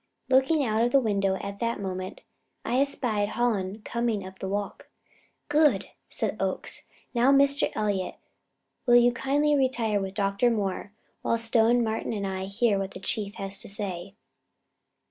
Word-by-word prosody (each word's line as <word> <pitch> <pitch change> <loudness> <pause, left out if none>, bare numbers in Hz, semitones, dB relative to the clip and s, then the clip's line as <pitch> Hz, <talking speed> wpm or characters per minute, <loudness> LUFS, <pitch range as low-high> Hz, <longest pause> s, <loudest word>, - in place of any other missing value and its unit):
Looking 265 +3 +4
out 220 0 +1
of 240 - +2
the 275 - +6
window 200 -5 +1
at 200 0 -6
that 230 -1 -1
moment, 185 -1 -5 0.4
I 250 - +1
espied 225 -7 0
Hallen 210 -4 -1
coming 235 -4 -1
up 190 0 -11
the 190 - -4
walk. 200 +1 -4 0.6
"Good!" 295 -9 +3 0.2
said - - -2
Oakes. - - -2 0.3
"Now, 245 +2 +4
Mr. 280 +1 +3
Elliott, 200 -4 -1 0.7
will 240 - +6
you 240 0 +6
kindly 285 +4 +1
retire 235 -6 +1
with 190 0 -5
Dr. 200 +3 +2
Moore, 200 -3 -2 0.3
while 230 - +1
Stone, 230 +1 +3
Martin 220 0 -2
and 200 -2 -2
I 190 -1 -3
hear 200 +1 +1
what 195 0 -4
the - - -6
Chief 205 +1 -2
has 195 0 -4
to - - -6
say." 195 -2 -5
215 Hz, 160 wpm, -27 LUFS, 195-245 Hz, 0.7 s, the